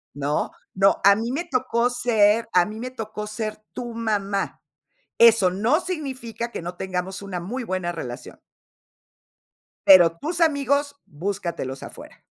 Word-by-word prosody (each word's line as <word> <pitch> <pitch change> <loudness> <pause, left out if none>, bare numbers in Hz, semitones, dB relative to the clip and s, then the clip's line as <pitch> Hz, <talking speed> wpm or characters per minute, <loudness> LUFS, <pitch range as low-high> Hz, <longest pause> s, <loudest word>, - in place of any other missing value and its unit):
¿No? 145 +1 -1 0.2
No, 195 +1 +3
a 200 0 +7
mí 230 +3 -3
me 335 +6 -2
tocó 250 -4 +1
ser 225 -3 +2
a 180 -1 +5
mí 215 +1 -7
me 255 +1 -5
tocó 215 -3 -6
ser 215 0 -4 0.2
tu 240 -2 -6
mamá. 205 -3 -2 0.6
Eso 225 -5 +6
no 220 - +1
significa 260 - -5
que - - -5
no 175 +1 -6
tengamos 185 +1 -4
una 195 -3 -5
muy 235 +9 -5
buena 185 -5 -2
relación. 125 -8 -8 1.5
Pero 175 -3 +7
tus 330 - -4
amigos 285 -2 +2
búscatelos 170 -5 -4
afuera. - - -12
215 Hz, 140 wpm, -23 LUFS, 185-245 Hz, 1.5 s, a